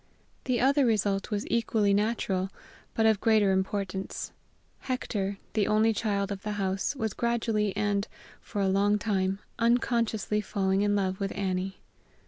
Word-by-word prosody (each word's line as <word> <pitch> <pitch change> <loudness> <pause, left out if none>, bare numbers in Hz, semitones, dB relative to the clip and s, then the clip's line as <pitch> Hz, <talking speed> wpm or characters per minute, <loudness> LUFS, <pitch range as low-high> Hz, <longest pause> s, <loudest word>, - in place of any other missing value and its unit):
The 250 -2 +1
other 275 +2 +4
result 205 -4 +1
was 210 0 -2
equally 220 -3 +2
natural, 200 -3 0 0.5
but 225 - +2
of 220 -3 +3
greater 215 -3 +4
importance; 190 0 -2 0.5
Hector, 205 -6 -2 0.2
the 210 -2 +1
only 215 +1 +3
child 200 -2 -1
of 195 -1 -4
the 210 0 -3
house, 195 +5 -1
was 220 -6 -2
gradually 225 -3 0
and, 205 0 0 0.3
for 205 - -4
a 195 - +2
long 200 +2 +3
time, 195 -3 0 0.2
unconsciously 230 -3 +1
falling 195 -1 0
in 205 0 +2
love 190 -2 0
with 195 -1 -2
Annie. 190 -1 -2
205 Hz, 145 wpm, -28 LUFS, 195-225 Hz, 0.5 s, other